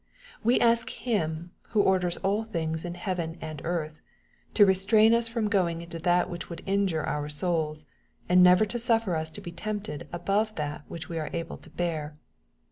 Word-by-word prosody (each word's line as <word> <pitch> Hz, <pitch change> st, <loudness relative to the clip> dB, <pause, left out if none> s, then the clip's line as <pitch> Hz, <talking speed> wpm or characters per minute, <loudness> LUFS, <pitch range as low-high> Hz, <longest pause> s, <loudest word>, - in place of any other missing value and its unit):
We 235 Hz, +3 st, +4 dB
ask 230 Hz, 0 st, +4 dB
Him, 170 Hz, -7 st, -2 dB, 0.2 s
who 215 Hz, -, +3 dB
orders 180 Hz, -2 st, +2 dB
all 205 Hz, +3 st, 0 dB
things 160 Hz, -6 st, -3 dB
in 175 Hz, 0 st, -5 dB
heaven 175 Hz, -2 st, -3 dB
and 155 Hz, -2 st, -6 dB
earth, 160 Hz, -2 st, -3 dB, 0.5 s
to 205 Hz, -, +8 dB
restrain 200 Hz, +4 st, +5 dB
us 235 Hz, 0 st, +3 dB
from 230 Hz, -2 st, -1 dB
going 175 Hz, -5 st, +1 dB
into 170 Hz, -1 st, -7 dB
that 175 Hz, +1 st, +2 dB
which 175 Hz, 0 st, -7 dB
would 170 Hz, -1 st, -8 dB
injure 195 Hz, -5 st, +1 dB
our 150 Hz, 0 st, -2 dB
souls, 155 Hz, -1 st, -1 dB, 0.4 s
and 180 Hz, 0 st, +6 dB
never 180 Hz, +4 st, +7 dB
to 240 Hz, +3 st, -4 dB
suffer 225 Hz, -6 st, +2 dB
us 160 Hz, 0 st, -2 dB
to -, -, -9 dB
be 170 Hz, -, -7 dB
tempted 205 Hz, -4 st, -5 dB
above 200 Hz, +5 st, 0 dB
that 150 Hz, -1 st, -4 dB
which 160 Hz, -2 st, -7 dB
we 165 Hz, -1 st, -3 dB
are 155 Hz, -, -3 dB
able 165 Hz, 0 st, -4 dB
to -, -, -16 dB
bear. 155 Hz, -4 st, -3 dB
175 Hz, 185 wpm, -28 LUFS, 160-205 Hz, 0.5 s, to